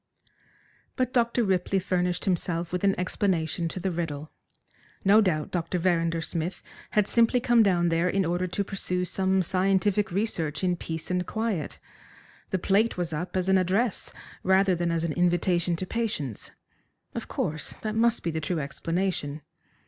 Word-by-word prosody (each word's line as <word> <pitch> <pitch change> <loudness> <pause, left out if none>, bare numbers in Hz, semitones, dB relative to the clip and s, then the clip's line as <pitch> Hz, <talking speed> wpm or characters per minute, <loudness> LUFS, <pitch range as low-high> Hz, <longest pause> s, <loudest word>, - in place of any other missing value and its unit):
But 255 -1 -1
Dr. 235 0 +2
Ripley 190 -1 +1
furnished 180 -1 0
himself 175 -2 0
with 180 - -1
an 195 -2 +2
explanation 175 -3 0
to 175 - -4
the 190 +1 -1
riddle. 155 -3 -4 0.7
No 205 +3 +7
doubt 155 -7 0
Dr. 175 0 -1
Verrinder 170 -2 +1
Smith 165 +2 -4 0.3
had 210 -1 +2
simply 235 +1 +3
come 240 -1 +4
down 175 -5 +3
there 165 +2 +2
in 195 0 +1
order 175 +2 0
to 200 +3 -1
pursue 180 -2 -2
some 190 +1 +1
scientific 195 +2 +1
research 170 -6 -1
in 180 -1 +2
peace 160 0 -5
and 180 0 0
quiet. 220 -9 -2 0.7
The - - 0
plate 200 +5 +2
was 175 -2 -2
up 175 +5 -3
as 185 0 0
an 190 0 +5
address 195 +5 0 0.3
rather 190 0 +4
than 175 0 0
as 165 -1 0
an 165 -2 -1
invitation 175 0 +2
to 185 - -4
patients. 185 - -3 0.6
Of - - -5
course, 155 0 -3
that 215 -1 -2
must 230 +1 +2
be 170 - -1
the 160 0 -3
true 170 +3 -1
explanation. 155 +1 -2
180 Hz, 165 wpm, -27 LUFS, 170-195 Hz, 0.7 s, No